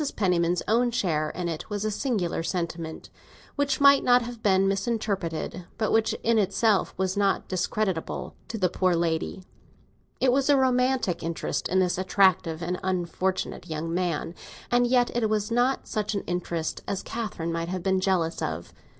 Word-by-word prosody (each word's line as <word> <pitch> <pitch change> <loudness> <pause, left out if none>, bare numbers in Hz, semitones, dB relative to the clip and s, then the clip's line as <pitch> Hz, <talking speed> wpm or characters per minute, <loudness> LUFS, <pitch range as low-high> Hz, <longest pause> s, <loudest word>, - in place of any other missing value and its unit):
Penniman's 175 -3 +1
own 240 +3 +3
share 165 -10 0
in 175 +2 -4
it 165 +3 -5
was 205 0 -2
a 215 - 0
singular 205 -9 -1
sentiment, 165 -2 -4 0.4
which 285 -1 0
might 280 -1 +6
have 245 -2 +3
been 195 -2 +3
misinterpreted, 195 -5 -2
but 215 -2 0
which 225 0 +2
in 230 -1 +3
itself 200 +1 +2
was 190 0 0
not 200 -1 +1
discreditable 185 -1 -2
to 225 - -4
the 185 -3 +2
poor 185 0 +1
lady. 165 +2 -1 0.8
It 260 - +4
was 270 +2 +2
a 285 - +6
romantic 255 -7 +2
interest 165 0 -2
in 185 - +1
this 180 -1 +2
attractive 185 -3 +2
and 180 +2 -2
unfortunate 185 0 -2
young 160 +1 -3
man, 170 -2 -1 0.4
and 245 0 +4
yet 245 -1 +2
it 230 -3 +1
was 215 0 -1
not 245 +3 +1
such 215 -2 -2
an 200 - -2
interest 170 -2 -3
as 200 - -2
Catherine 190 -8 -4
might 165 0 -2
have 185 -1 -3
been 190 0 +2
jealous 185 -4 0
of. 80 +2 -3
Mrs. - - -21
190 Hz, 165 wpm, -26 LUFS, 170-225 Hz, 0.8 s, might